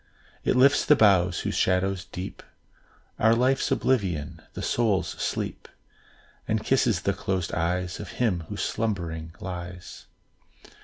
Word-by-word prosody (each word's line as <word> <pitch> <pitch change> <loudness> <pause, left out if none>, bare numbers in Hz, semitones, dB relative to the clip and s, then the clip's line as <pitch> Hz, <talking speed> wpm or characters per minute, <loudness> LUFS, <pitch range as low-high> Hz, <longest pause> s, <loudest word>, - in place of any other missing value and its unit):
It - - +2
lifts 135 +3 +5
the 150 - +6
boughs, 95 -6 +4
whose - - -2
shadows 90 0 +1
deep 90 +2 -7 0.8
Are 110 +1 +5
Life's 130 +3 +2
oblivion, 95 - 0
the - - -5
soul's 100 -7 +1
sleep, - - -4 0.8
And 110 -1 0
kisses 115 -7 +2
the 100 - +1
closed 95 -2 -2
eyes 90 +2 -1
Of 105 - -7
him, 95 -9 0
who - - -5
slumbering 85 -7 -3
lies. 90 -2 -7
95 Hz, 125 wpm, -26 LUFS, 90-110 Hz, 0.8 s, the